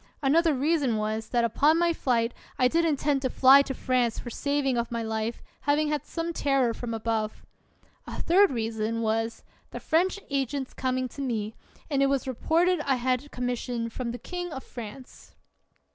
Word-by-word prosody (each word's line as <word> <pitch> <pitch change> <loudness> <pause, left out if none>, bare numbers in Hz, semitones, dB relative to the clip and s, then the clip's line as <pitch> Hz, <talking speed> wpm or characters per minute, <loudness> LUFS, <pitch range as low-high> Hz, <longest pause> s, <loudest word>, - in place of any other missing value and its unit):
Another 315 +3 +4
reason 280 -4 +1
was, 215 +1 -2
that 240 -1 +1
upon 290 +8 +3
my 340 0 +3
flight 240 -6 0 0.2
I 255 -2 +4
did 335 +5 +2
intend 290 -2 +1
to 260 - 0
fly 270 +2 +7
to 270 -1 -4
France 245 -3 0
for 240 - -6
saving 280 0 0
of 235 0 -1
my 230 -1 -2
life, 220 +1 -3 0.3
having 300 +1 +3
had 300 -2 -2
some 335 0 -3
terror 275 -6 +1
from 230 0 -5
above. 220 -1 -2 0.6
A - - -6
third 390 +4 +5
reason 225 -1 -2
was, 225 +1 -1 0.3
the - - -7
French 365 +5 +1
agent's 275 -1 -2
coming 255 0 -1
to 280 - -8
me, 225 -5 -2 0.3
and 280 -3 0
it 275 - +5
was 275 -1 0
reported 335 +8 +2
I 275 -2 +1
had 255 +3 -1
com 250 -2 -4
mission 245 -1 -2
from 245 +1 -4
the 240 - -4
king 355 +4 -5
of 265 -3 -6
France. 240 +2 -10
255 Hz, 180 wpm, -27 LUFS, 230-290 Hz, 0.6 s, fly